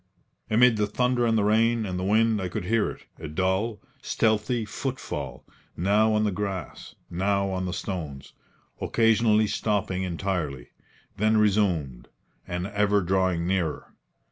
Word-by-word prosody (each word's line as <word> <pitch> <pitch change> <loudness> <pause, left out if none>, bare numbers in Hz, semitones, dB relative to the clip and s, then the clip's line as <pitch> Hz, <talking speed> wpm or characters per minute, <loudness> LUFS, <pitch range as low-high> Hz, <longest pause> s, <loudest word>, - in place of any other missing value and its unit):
Amid 115 +1 +5
the 105 -1 +1
thunder 125 +2 +1
and 115 -1 +2
the 105 - +2
rain 110 +2 +2
and 90 -2 -3
the - - -3
wind 110 +2 +2
I 95 - -2
could 95 0 -4
hear 115 +2 +1
it - - -10
a 80 - -6
dull, 95 +7 -1 0.2
stealthy 110 +1 0
footfall, 100 - -5 0.3
now 105 +5 +3
on 105 0 +2
the 105 - +1
grass, 95 -3 -5 0.2
now 100 +2 0
on 95 0 -2
the - - -2
stones 80 -7 -5 0.5
occasionally 110 -1 +3
stopping 105 -3 -1
entirely, 85 -8 -3 0.5
then 110 +2 +3
resumed, 95 - +1 0.4
and 90 +1 -3
ever 105 0 +2
drawing 95 -2 +1
nearer. 90 -4 -2
100 Hz, 145 wpm, -26 LUFS, 90-110 Hz, 0.5 s, Amid